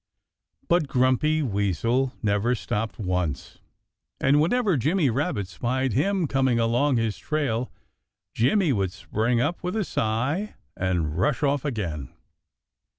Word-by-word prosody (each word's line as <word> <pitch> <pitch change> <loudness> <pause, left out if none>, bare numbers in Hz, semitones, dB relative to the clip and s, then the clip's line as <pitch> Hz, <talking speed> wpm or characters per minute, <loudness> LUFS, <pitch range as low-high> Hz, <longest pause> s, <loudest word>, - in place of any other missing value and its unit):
But 170 -4 +2
Grumpy 135 +4 +2
Weasel 115 - 0
never 105 +4 +1
stopped 110 0 -3
once. 90 - -3 0.6
And 140 +2 +4
whenever 205 +2 +2
Jimmy 150 +2 +2
Rabbit 120 - -1
spied 125 +6 -1
him 185 - +1
coming 130 -3 +1
along 120 +4 +2
his 115 -2 -1
trail 135 -6 -1 0.6
Jimmy 150 - +2
would 95 -4 0
spring 110 +4 -1
up 150 +8 -1
with 180 +3 -3
a 220 - +1
sigh 130 - -1 0.2
and 85 -4 -1
rush 125 +9 +1
off 140 -1 +1
again. 90 - -3
125 Hz, 125 wpm, -25 LUFS, 105-150 Hz, 0.6 s, And